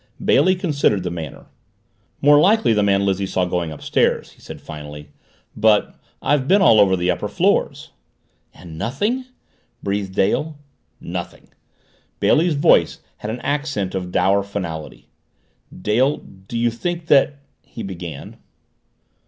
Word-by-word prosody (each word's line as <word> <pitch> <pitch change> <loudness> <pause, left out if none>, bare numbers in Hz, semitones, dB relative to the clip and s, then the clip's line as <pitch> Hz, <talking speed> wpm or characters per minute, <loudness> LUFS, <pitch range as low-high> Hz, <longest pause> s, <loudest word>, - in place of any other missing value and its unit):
Bailey 185 0 +4
considered 145 - 0
the 90 - -3
matter. 80 -4 -7 0.8
"More 145 +1 +6
likely 205 - +4
the 105 - +2
man 100 -1 +2
Lizzie 95 0 0
saw 95 -1 0
going 90 -2 -2
upstairs," 75 - 0
he - - -22
said - - -10
finally. 75 -1 -10 0.4
"But 105 -1 +3 0.3
I've 140 -2 +1
been 200 +5 +5
all 135 - +6
over 95 -2 +5
the 90 0 +1
upper - - -3
floors." - - 0 0.6
"And 80 -2 -12
nothing?" 210 - -1 0.6
breathed 100 -1 -3
Dale. 150 +11 0 0.4
"Nothing." - - -7 0.7
Bailey's 165 0 +3
voice 140 - +3 0.2
had 105 - -6
an 120 +3 -5
accent 140 -9 -2
of 90 -2 -4
dour 100 +2 +2
finality. 90 -6 -6 0.6
"Dale, 125 +7 +1
do 95 +5 -10
you 120 0 +1
think 170 +8 -4
that 145 -2 +3
" - - -46
he 115 - -9
began. 85 -7 -8
105 Hz, 135 wpm, -20 LUFS, 90-145 Hz, 0.8 s, More